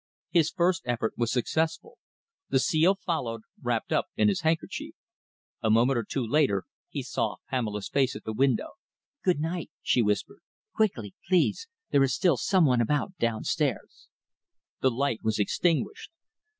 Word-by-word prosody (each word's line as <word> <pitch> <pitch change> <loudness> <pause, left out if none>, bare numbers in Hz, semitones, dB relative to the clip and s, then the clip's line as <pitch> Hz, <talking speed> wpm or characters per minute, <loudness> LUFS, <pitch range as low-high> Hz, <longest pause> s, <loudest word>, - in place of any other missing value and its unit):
His 165 -3 +4
first 175 +2 +1
effort 120 -2 -1
was 120 -1 0
successful. 160 +6 -1 0.5
The - - +3
seal 160 +7 +3
followed, 130 - -3 0.2
wrapped - - -1
up - - +1
in 105 -1 +4
his 100 - 0
handkerchief. 160 +1 -2 0.7
A 110 - +1
moment 120 +3 +4
or - - -2
two 125 +4 -2
later 115 - +2 0.3
he - - -4
saw - - -2 0.2
Pamela's 105 -6 -2
face 135 -2 +1
at 105 - -8
the 110 - -4
window. 130 +1 +1 0.5
"Good 180 -5 +2
night!" 165 +2 -3
she 125 - +3
whispered. 105 -2 -1 0.3
"Quickly, 130 - 0
please. 185 - +2 0.2
There 140 - +4
is 135 -1 +3
still 175 -8 +3
some 185 - +3
one 125 -4 +3
about 150 - 0
downstairs." 115 -2 -1 0.7
The 130 - +3
light 130 -1 -1
was 110 -1 0
extinguished. 175 - 0
135 Hz, 150 wpm, -28 LUFS, 115-165 Hz, 0.7 s, His